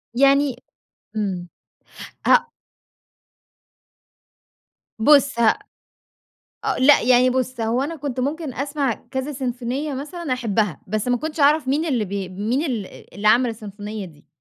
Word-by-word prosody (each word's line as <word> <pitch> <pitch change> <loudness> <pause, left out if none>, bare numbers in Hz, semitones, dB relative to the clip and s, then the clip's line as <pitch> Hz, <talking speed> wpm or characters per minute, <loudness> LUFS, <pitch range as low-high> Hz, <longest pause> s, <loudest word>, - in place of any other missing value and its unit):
يعني 275 0 +4 0.6
إمم، 190 -4 -2 0.8
ه - - +4 2.5
بُص 280 0 +5
ه 225 -2 +5 1.1
أ - - 0
لأ، 280 +3 +6
يعني 250 +1 +5
بُص 255 -1 -2
هو 230 +3 +1
أنا 320 +4 -4
كنت 275 -3 -4
ممكن 285 +1 -3
أسمع 280 -1 -1 0.2
كذا 265 +3 -3
سيمفونية 260 +2 -3
مثلًا 300 +2 -5
أحبها، 215 - 0
بس 215 +4 -1
ما 245 - +3
كنتش 310 +3 -5
أعرف 290 0 +4
مين 290 +4 +1
اللي 255 -9 0
ب 190 - -10 0.3
مين 240 +7 0
ال 230 - -6
اللي 205 +3 +1
عمل 240 +3 +4
السيمفونية 210 -1 -7
دي. 150 -4 -18
255 Hz, 130 wpm, -22 LUFS, 220-285 Hz, 2.5 s, لأ